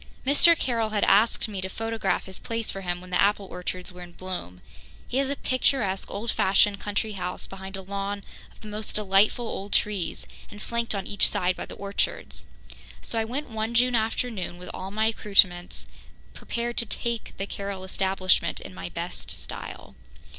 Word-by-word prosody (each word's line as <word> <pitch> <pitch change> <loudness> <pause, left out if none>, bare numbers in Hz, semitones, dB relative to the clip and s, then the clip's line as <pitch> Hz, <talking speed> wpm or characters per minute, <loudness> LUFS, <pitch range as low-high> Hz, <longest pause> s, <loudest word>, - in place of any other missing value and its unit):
Mr. 325 +5 +6
Carroll 230 -5 0
had 210 -1 +1
asked 215 +4 +5
me 200 -3 -4
to 190 - -3
photograph 225 +2 -1
his 190 -1 -3
place 230 -1 -2
for 195 - -6
him 175 -1 -2
when 180 0 -11
the 180 - +3
apple 200 0 +3
orchards 180 0 -4
were 180 - -10
in 175 -1 -10
bloom. 170 - -6 0.5
He 255 - -1
has 275 0 +2
a 280 - 0
picturesque 255 -8 +1
old 215 +3 -2
fashioned 200 +1 +4
country 205 +2 -1
house 180 -3 -3
behind 195 0 -7
a 190 - -7
lawn 200 +1 -3 0.3
of - - -21
the 215 - -9
most 210 +1 -3
delightful 210 +3 +3
old 200 -1 -4
trees 200 -5 +1 0.2
and 205 - -10
flanked 235 0 -1
on 195 - -2
each 205 - +4
side 180 0 +1
by - - -6
the - - -8
orchards. 200 0 -2 0.6
So 230 - -1
I 220 - +1
went 260 +3 -4
one 220 +1 -2
June 250 +1 +5
afternoon, 220 -4 0
with 180 - -8
all 190 - -5
my 215 +2 +1
accoutrements, 195 -5 +3 0.5
prepared 240 0 -3
to 235 - +3
"take" 235 +1 -2
the 195 - -2
Carroll 200 -1 -5
establishment 190 -2 +1
in - - -9
my 90 -1 -6
best - - -5
style. - - -6
200 Hz, 185 wpm, -27 LUFS, 190-225 Hz, 0.6 s, Mr